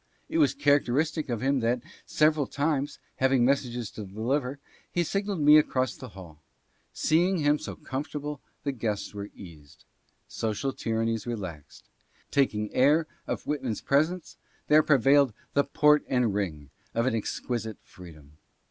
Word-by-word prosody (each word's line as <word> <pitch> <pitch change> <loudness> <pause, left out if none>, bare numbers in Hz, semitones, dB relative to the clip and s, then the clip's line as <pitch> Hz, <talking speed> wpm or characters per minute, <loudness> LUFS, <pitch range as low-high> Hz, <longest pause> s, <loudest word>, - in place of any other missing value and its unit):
It 330 - 0
was 300 - +4
characteristic 150 - +1
of 115 -3 -2
him 135 0 +2
that, 120 +1 0 0.2
sev 155 0 +4
eral 145 -4 -2
times, 145 -1 -1 0.2
having 130 -2 +3
messages 125 -4 0
to 110 - -7
deliver, 125 +7 -2 0.3
he 175 - +1
signalled 195 0 -2
me 150 +1 +8
across 130 -4 0
the 130 - -9
hall. 80 -5 -12 0.5
Seeing 175 +4 +2
him 145 -1 +2
so - - -6
comfortable, 145 +2 -5 0.2
the 140 - 0
guests 110 -6 -3
were 100 0 -6
eased. 80 -7 -14 0.4
Social 115 +5 -2
tyrannies 115 0 -2
relaxed. 95 -11 -6 0.5
Taking 105 -7 +1
air 150 +5 +4 0.2
of - - -3
Whitman's 135 -7 -2
presence, 155 +5 0 0.3
there 150 +1 +7
pre 150 -2 +4
vailed 135 0 +4 0.2
the 140 - +4
port 150 +1 +4
and 125 -5 +1
ring 80 -9 -3 0.2
of 115 +1 +1
an 130 - +1
exquisite 110 0 -3
freedom. 75 -5 -14
130 Hz, 150 wpm, -27 LUFS, 110-150 Hz, 0.5 s, me